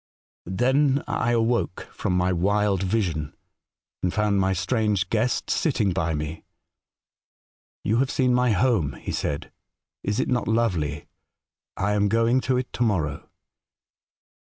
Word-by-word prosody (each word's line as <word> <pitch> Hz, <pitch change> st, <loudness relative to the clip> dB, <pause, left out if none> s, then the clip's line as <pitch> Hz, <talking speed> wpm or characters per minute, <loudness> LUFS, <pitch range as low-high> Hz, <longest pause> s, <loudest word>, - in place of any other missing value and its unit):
" -, -, -
Then 130 Hz, +8 st, +2 dB
I 120 Hz, -, 0 dB
awoke 115 Hz, -4 st, 0 dB
from 90 Hz, -, -1 dB
my 90 Hz, +1 st, +2 dB
wild 100 Hz, +2 st, +1 dB
vision, 90 Hz, -7 st, -1 dB, 0.7 s
and 90 Hz, -, 0 dB
found 105 Hz, -1 st, +1 dB
my 95 Hz, 0 st, +2 dB
strange 100 Hz, 0 st, 0 dB
guest 115 Hz, +2 st, 0 dB
sitting 110 Hz, -, +1 dB
by 80 Hz, -2 st, 0 dB
me. 75 Hz, +2 st, -5 dB, 0.5 s
" -, -, -71 dB
' -, -, -86 dB
You 110 Hz, +3 st, +1 dB
have 130 Hz, +1 st, +2 dB
seen 130 Hz, -3 st, +2 dB
my 125 Hz, 0 st, +3 dB
home,' 105 Hz, -, +2 dB
he -, -, -6 dB
said. 70 Hz, -1 st, -3 dB, 0.3 s
' -, -, -65 dB
Is 100 Hz, +1 st, -1 dB
it -, -, +1 dB
not 125 Hz, -2 st, 0 dB
lovely? 90 Hz, -11 st, 0 dB, 0.7 s
I 100 Hz, +3 st, 0 dB
am 105 Hz, 0 st, +2 dB
going 115 Hz, +3 st, +3 dB
to 130 Hz, -, +3 dB
it 125 Hz, 0 st, -4 dB
to -, -, -5 dB
morrow.' 85 Hz, -11 st, 0 dB
105 Hz, 150 wpm, -25 LUFS, 90-120 Hz, 0.7 s, my